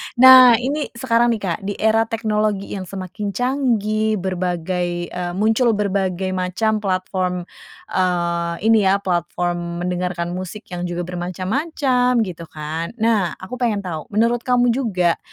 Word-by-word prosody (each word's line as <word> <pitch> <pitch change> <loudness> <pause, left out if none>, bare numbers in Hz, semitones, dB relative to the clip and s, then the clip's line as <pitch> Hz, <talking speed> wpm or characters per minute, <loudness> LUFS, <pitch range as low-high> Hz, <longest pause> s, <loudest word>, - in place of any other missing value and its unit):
Nah, 255 -1 +9
ini 285 0 -2
sekarang 235 0 +2
nih, 215 - -6
Kak, 175 -3 -2
di 205 - -2
era 220 +1 +2
teknologi 215 -3 -1
yang 190 -2 -5
semakin 195 +2 -5
canggih, 220 -5 0
berbagai, 180 -2 -2
eee, 180 -1 -4
muncul 225 +3 +2
berbagai 190 -2 -1
macam 185 +4 0
platform, 185 -2 -2 0.5
eee, 170 -2 0
ini 220 -3 +4
ya 200 +1 +2
platform 175 -1 -2
mendengarkan 180 -1 -2
musik 185 +4 -6
yang 180 0 -4
juga 175 0 -3
bermacam-macam 245 - 0
gitu 170 -4 -6
kan. 160 +6 -5
Nah, 215 - +1
aku 240 +6 -7
pengen 220 -5 0
tahu, 160 -5 -5
menurut 230 +3 +2
kamu 245 -1 +3
juga, 190 -9 +1
190 Hz, 135 wpm, -20 LUFS, 180-225 Hz, 0.5 s, Nah